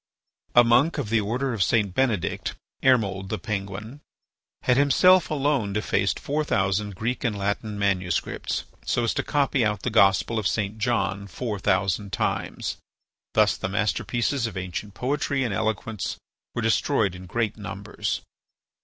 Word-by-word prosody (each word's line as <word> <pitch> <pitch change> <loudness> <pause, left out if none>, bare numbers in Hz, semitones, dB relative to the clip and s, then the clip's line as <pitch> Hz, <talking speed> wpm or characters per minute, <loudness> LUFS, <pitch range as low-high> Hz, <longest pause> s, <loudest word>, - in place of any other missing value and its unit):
A 120 - +9
monk 120 +7 +3
of 105 - -2
the 115 -1 +3
order 125 +5 -1
of 110 - -3
St. 105 -2 +2
Benedict, 115 -6 0 0.3
Ermold 100 -7 +2
the 110 - -1
Penguin, 105 +6 -5 0.6
had 125 - +4
himself 165 +7 +5
alone 140 -8 0
defaced 105 - 0
four 150 +2 -1
thousand 100 -4 0
Greek 115 +6 -2
and 110 -5 0
Latin 100 +1 -2
manuscripts 95 -4 -1 0.2
so 120 - 0
as 115 - +1
to - - 0
copy 140 -3 +1
out 105 -3 0
the - - -1
Gospel 100 +4 +4
of 105 - 0
St. 105 +1 -2
John 100 -3 0
four 105 +2 -4
thousand 100 +1 +1
times. - - -2 0.6
Thus - - +4
the 95 - -3
masterpieces 115 +5 0
of 105 -4 -7
ancient 95 +2 -5
poetry 140 +1 0
and 115 -5 -1
eloquence 110 0 -2 0.4
were 120 - -1
destroyed 115 -3 +2
in 90 0 -10
great 110 0 -1
numbers. 105 -1 -4
110 Hz, 150 wpm, -25 LUFS, 100-125 Hz, 0.6 s, A